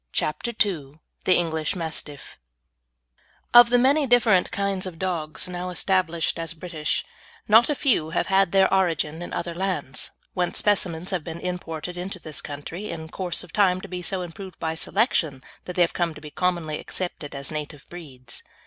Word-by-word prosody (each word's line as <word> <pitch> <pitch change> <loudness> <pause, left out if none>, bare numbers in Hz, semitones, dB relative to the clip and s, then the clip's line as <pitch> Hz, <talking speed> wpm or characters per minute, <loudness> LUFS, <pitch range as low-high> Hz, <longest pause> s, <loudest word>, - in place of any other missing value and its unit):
CHAPTER 155 +10 -1 0.2
II 155 -6 -5 0.3
THE 185 - +5
ENGLISH 160 -2 0
MASTIFF 160 - -5 1.1
Of 240 0 +10
the 245 - +5
many 275 +4 +4
different 230 -6 +4
kinds 200 -3 -1
of 175 -3 -8
dogs 165 -4 -2
now 180 0 -4
established 180 -3 +1
as 165 0 -4
British, 160 -2 -2 0.4
not 225 +5 +7
a 295 - +2
few 235 - +2
have - - 0
had 195 -2 +3
their 195 -1 +4
origin 165 -4 +1
in 175 - -6
other 170 - -3
lands, 175 -7 -2 0.2
whence 180 -2 -1
specimens 185 -4 +1
have 180 -4 -1
been 165 +1 -6
imported 180 -1 -4
into 185 +1 -4
this 155 -4 -5
country, 160 +8 -6
in 160 -1 -6
course 180 -1 -1
of 180 - -14
time 185 -3 +4
to - - -8
be 180 -1 -5
so 185 +1 -1
improved 180 +1 -9
by 160 -1 -2
selection 160 - 0 0.2
that 180 - -6
they 180 - +5
have 170 - 0
come 170 -3 -1
to 150 - -11
be 150 -1 -9
commonly 170 -4 -1
accepted 170 -6 -5
as 140 0 -3
native 150 -1 -6
breeds. 130 -8 -8
175 Hz, 175 wpm, -25 LUFS, 160-190 Hz, 1.1 s, Of